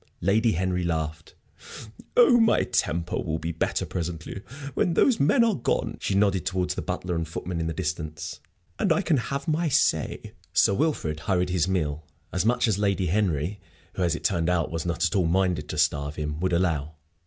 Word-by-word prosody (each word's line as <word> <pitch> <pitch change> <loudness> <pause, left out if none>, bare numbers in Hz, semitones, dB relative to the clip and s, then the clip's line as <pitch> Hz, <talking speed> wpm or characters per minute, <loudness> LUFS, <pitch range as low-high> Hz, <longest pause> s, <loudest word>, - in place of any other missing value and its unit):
Lady 110 +5 +3
Henry 90 +1 0
laughed. 80 -2 -3 0.8
"Oh, 245 0 +7
my 225 -1 +4
temper 85 +2 -1
will 80 -1 -2
be 80 +1 -3
better 80 - -1
presently, 85 +2 -5 0.3
when 170 +5 +1
those 250 +4 +4
men 230 - +4
are 230 -2 +3
gone" 125 - -1
she 95 - -1
nodded 100 -2 +2
towards 90 -1 -1
the - - -4
butler 90 -1 -3
and 85 -1 -2
footman 85 +2 -4
in 80 - -1
the - - -1
distance 75 +1 -4 0.4
"and - - +2
I - - +3
can 160 -4 +2
have 140 +4 -3
my 160 +1 +1
say." 130 - +1 0.2
Sir - - +4
Wilfrid 100 - 0
hurried 90 +2 0
his 90 -1 +1
meal 80 -5 -1 0.3
as 90 +3 +1
much 120 0 +2
as 105 -3 +1
Lady 100 -3 +1
Henry 95 -2 0 0.3
who, - - -4
as 85 -2 +2
it - - -7
turned 85 -4 +1
out, 85 -3 +1
was 85 +1 -3
not 85 -1 0
at - - 0
all 90 -4 +3
minded 90 -4 +1
to 80 - -4
starve 75 -1 +1
him 75 0 -4
would 90 +1 0
allow. 80 -4 0
90 Hz, 195 wpm, -26 LUFS, 80-105 Hz, 0.8 s, Oh